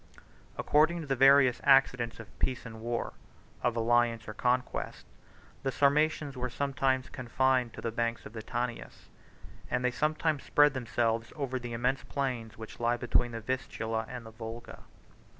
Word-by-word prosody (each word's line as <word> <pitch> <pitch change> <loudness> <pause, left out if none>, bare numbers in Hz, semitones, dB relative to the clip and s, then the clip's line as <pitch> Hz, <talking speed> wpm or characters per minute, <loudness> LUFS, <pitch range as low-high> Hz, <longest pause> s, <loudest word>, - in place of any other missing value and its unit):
According 160 +3 +3
to - - -6
the 135 -1 0
various 135 -1 +6
accidents 125 -4 +4
of 110 -4 -13
peace 130 -1 -1
and 110 -1 -9
war, 120 +1 -3 0.5
of 120 -1 +1
alliance 115 0 +2
or 105 - -5
conquest, 125 +3 -1 0.6
the 135 - -1
Sarmatians 145 +2 +2
were 125 0 -3
sometimes 135 -1 0
confined 130 -1 +1
to - - -8
the 115 - -2
banks 115 0 -2
of - - -10
the 110 - -6
Tanais; 120 +2 -4 0.7
and 125 - 0
they 125 - +3
sometimes 155 +2 0
spread 145 -1 +4
themselves 115 -2 -1
over 135 -4 -2
the 120 -1 -6
immense 125 +3 0
plains 120 -5 -3
which 110 -1 -10
lie 120 +1 +1
between 120 0 +1
the 115 - -5
Vistula 115 -2 -3
and 125 -2 -7
the 110 - -10
Volga. 115 +1 -8
125 Hz, 160 wpm, -30 LUFS, 115-135 Hz, 0.7 s, various